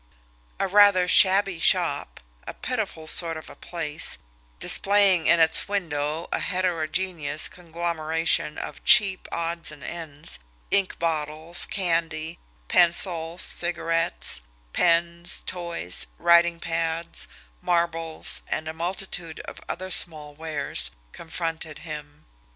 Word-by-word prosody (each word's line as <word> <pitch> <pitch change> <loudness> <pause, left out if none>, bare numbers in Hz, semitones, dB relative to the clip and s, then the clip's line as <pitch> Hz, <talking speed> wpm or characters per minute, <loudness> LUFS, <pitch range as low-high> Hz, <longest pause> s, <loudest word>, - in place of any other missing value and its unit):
A - - 0
rather 200 -2 +4
shabby 195 -1 +4
shop, - - +1 0.3
a - - -7
pitiful 215 -10 -5
sort 165 0 +2
of 155 - -11
a - - -13
place, 160 -3 -3 0.4
displaying 195 -4 +4
in 170 - +4
its 160 0 +3
window 160 -5 -3
a - - -1
heterogeneous 180 -3 -1
conglomeration 165 -2 -2
of - - -8
cheap 200 -5 +5
odds 170 0 -3
and 140 - -13
ends, 150 - -7 0.3
ink 195 -2 0
bottles, 160 +1 +1
candy, 165 -3 -2 0.3
pencils, 170 - +2
cigarettes, 165 - +1 0.3
pens, 170 0 +3
toys, 170 - -3
writing 170 0 +3
pads, 165 0 0 0.3
marbles, 165 -2 0
and 155 - -4
a 160 - -5
multitude 170 -1 -4
of - - -11
other 185 +1 -5
small 155 -4 +1
wares, 155 - -2 0.2
confronted 160 -1 -6
him. 150 -1 -10
165 Hz, 110 wpm, -24 LUFS, 160-175 Hz, 0.4 s, cheap